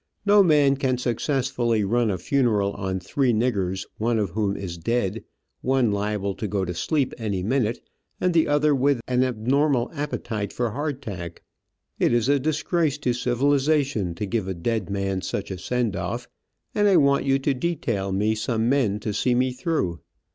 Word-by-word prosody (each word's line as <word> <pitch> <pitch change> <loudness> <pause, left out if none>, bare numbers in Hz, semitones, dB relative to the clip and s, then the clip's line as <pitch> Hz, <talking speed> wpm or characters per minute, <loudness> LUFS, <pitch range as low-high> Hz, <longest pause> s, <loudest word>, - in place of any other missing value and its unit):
No 205 0 +6
man 145 -6 +4
can 130 -2 0
successfully 125 -2 0
run 115 +3 +1
a 95 - -1
funeral 105 -1 +1
on 95 -2 -3
three 130 +8 0
niggers, 100 -5 0
one 115 +1 +1
of 100 -5 -1
whom 100 0 -1
is 85 -3 -6
dead, 115 +2 -1 0.4
one 130 -4 +2
liable 100 -1 -1
to 110 - -3
go 100 -1 -1
to 90 - -3
sleep 135 - 0
any 100 -5 -2
minute, 115 +1 -1 0.3
and 180 -1 +1
the 165 -1 +3
other 145 0 +3
with 140 -1 +2
an 125 0 +2
abnormal 130 +2 +1
appetite 115 -8 -3
for 120 -2 -2
hardtack. 125 - -5 0.6
It - - +3
is 120 +2 +2
a 145 0 +4
disgrace 155 +1 0
to 130 -4 0
civilization 135 - +1
to 105 - -3
give 105 -1 -2
a 95 - -3
dead 105 +3 -2
man 95 -1 -1
such 100 +1 -4
a 95 - -5
send 120 0 -1
off, - - -4 0.5
and 205 0 +3
I 195 -3 +5
want 140 -2 +4
you 135 0 +3
to 135 +1 0
detail 125 - -2
me 105 +3 +1
some 110 +1 -1
men 120 -6 +2
to 105 -1 -3
see 120 +4 +1
me 130 +1 +2
through. 125 - -1
120 Hz, 175 wpm, -24 LUFS, 100-140 Hz, 0.6 s, No